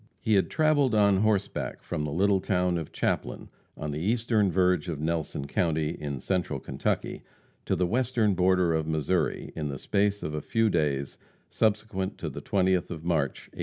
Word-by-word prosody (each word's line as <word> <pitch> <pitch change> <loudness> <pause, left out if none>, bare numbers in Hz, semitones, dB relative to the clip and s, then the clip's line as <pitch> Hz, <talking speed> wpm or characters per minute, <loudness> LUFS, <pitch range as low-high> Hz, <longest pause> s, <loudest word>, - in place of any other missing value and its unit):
He 110 - 0
had 95 - +3
traveled 145 -6 +2
on 100 -2 +4
horseback 105 -1 -1
from 75 - -3
the 75 - -3
little 95 +5 +3
town 90 -2 0
of 80 - -7
Chaplin, - - -2 0.3
on 75 - -4
the 75 - -3
eastern 110 +1 +1
verge 90 -2 +2
of 80 -4 -3
Nelson 80 -3 -2
county, 80 -1 0
in 70 -5 -5
Central 90 +5 -1
Kentucky, - - -2 0.5
to - - +2
the 90 - +1
western 115 0 +1
border 90 -1 +3
of 80 -1 -1
Missouri, 80 +3 -1
in 75 -2 -3
the 70 - -4
space 100 +6 0
of 75 - -3
a 75 - -2
few 115 +6 +1
days 70 -5 -1 0.3
subsequent 105 -3 0
to - - -5
the - - -7
20th 95 -2 +1
of 80 -2 -6
March, 80 -6 0
1869. - - -15
90 Hz, 180 wpm, -27 LUFS, 80-105 Hz, 0.5 s, on